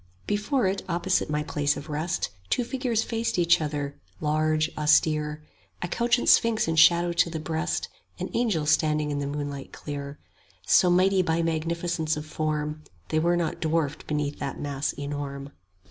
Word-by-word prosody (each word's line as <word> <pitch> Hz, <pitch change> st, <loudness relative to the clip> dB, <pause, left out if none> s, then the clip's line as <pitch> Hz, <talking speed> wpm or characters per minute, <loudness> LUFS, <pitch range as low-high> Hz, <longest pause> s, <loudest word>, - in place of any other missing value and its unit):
Before 210 Hz, +5 st, 0 dB
it, 190 Hz, +1 st, 0 dB
opposite 175 Hz, 0 st, 0 dB
my 150 Hz, 0 st, 0 dB
place 145 Hz, -1 st, 0 dB
of 145 Hz, -, -8 dB
rest, 155 Hz, -, -2 dB, 0.2 s
Two 245 Hz, -, +1 dB
figures 245 Hz, -3 st, -1 dB
faced 230 Hz, -2 st, -2 dB
each 175 Hz, -1 st, +4 dB
other, 145 Hz, -2 st, -3 dB, 0.3 s
large, 155 Hz, 0 st, +1 dB
austere; 150 Hz, 0 st, +2 dB, 0.4 s
A -, -, -1 dB
couchant 235 Hz, +6 st, +1 dB
sphinx 230 Hz, -5 st, +4 dB
in 165 Hz, -, 0 dB
shadow 170 Hz, +2 st, +5 dB
to 170 Hz, 0 st, +2 dB
the 160 Hz, -1 st, -4 dB
breast, 160 Hz, +2 st, -2 dB, 0.3 s
An -, -, -5 dB
angel 210 Hz, -11 st, +1 dB
standing 150 Hz, 0 st, +2 dB
in 145 Hz, -, -1 dB
the 140 Hz, -, -2 dB
moonlight 145 Hz, -1 st, -5 dB
clear; 140 Hz, -1 st, -6 dB, 0.5 s
10 -, -, -23 dB
So 180 Hz, -, +5 dB
mighty 185 Hz, +2 st, +4 dB
by 165 Hz, -1 st, 0 dB
magnificence 165 Hz, 0 st, -1 dB
of 150 Hz, -, -5 dB
form, 155 Hz, 0 st, -2 dB, 0.3 s
They 155 Hz, -, +2 dB
were 170 Hz, +2 st, +2 dB
not 170 Hz, -2 st, -2 dB
dwarfed 160 Hz, -3 st, -1 dB
beneath 150 Hz, -1 st, -2 dB
that 140 Hz, -2 st, -4 dB
mass 145 Hz, 0 st, -2 dB
enorm. 140 Hz, -1 st, -5 dB
155 Hz, 165 wpm, -26 LUFS, 150-175 Hz, 0.5 s, shadow